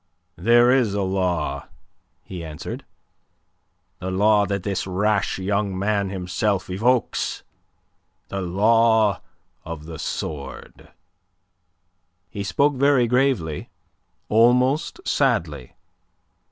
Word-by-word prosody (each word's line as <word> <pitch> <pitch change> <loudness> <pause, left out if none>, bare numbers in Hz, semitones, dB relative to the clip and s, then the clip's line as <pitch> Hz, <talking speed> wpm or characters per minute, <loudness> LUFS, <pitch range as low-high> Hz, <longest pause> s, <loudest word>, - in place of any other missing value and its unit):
"There 120 +5 +5
is 120 -6 +2
a 100 - 0
law," 90 -7 -1 0.6
he 90 -3 -8
answered. 75 -2 -7 1.1
"The 90 - -4
law 105 +2 +3
that 100 -2 -2
this 100 -1 -2
rash 100 +2 0
young 100 0 -1
man 100 0 0
himself 95 +1 -2
evokes. 120 +6 0 0.9
The 100 - -3
law 110 +2 +3 0.4
of 80 -2 -7
the 80 -2 -8
sword." 75 -3 -6 1.4
He 100 - -4
spoke 140 +10 +2
very 140 -2 +4
gravely, 125 - 0 0.6
almost 125 - +2
sadly. - - 0
100 Hz, 95 wpm, -23 LUFS, 90-115 Hz, 1.4 s, There